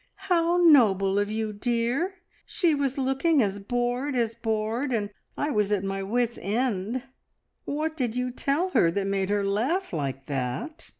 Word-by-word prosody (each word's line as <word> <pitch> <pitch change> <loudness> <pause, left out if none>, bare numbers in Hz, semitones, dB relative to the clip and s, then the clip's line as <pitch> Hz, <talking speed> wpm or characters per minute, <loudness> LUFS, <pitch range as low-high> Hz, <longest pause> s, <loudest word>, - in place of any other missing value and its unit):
"How 340 0 +3
noble 205 - +5
of 205 0 0
you, 215 0 -2
dear! 240 - -1 0.3
She 345 -5 +1
was 280 -2 -1
looking 270 +2 +2
as 200 -1 -2
bored 245 +5 -1
as 230 -2 +1
bored, 225 +3 -2
and 210 -3 -1 0.3
I 295 - -1
was 210 -3 +1
at 200 -2 +1
my 195 0 -2
wits' 235 +4 -1
end. 225 +2 -1 0.6
What 310 +2 -2
did 245 -5 -1
you 250 0 -1
tell 285 +8 0
her 170 - +4
that 195 +3 -1
made 195 -1 -1
her 205 -1 +1
laugh 245 - 0
like 135 -4 -3
that?" 140 - -4
235 Hz, 165 wpm, -26 LUFS, 200-275 Hz, 0.6 s, noble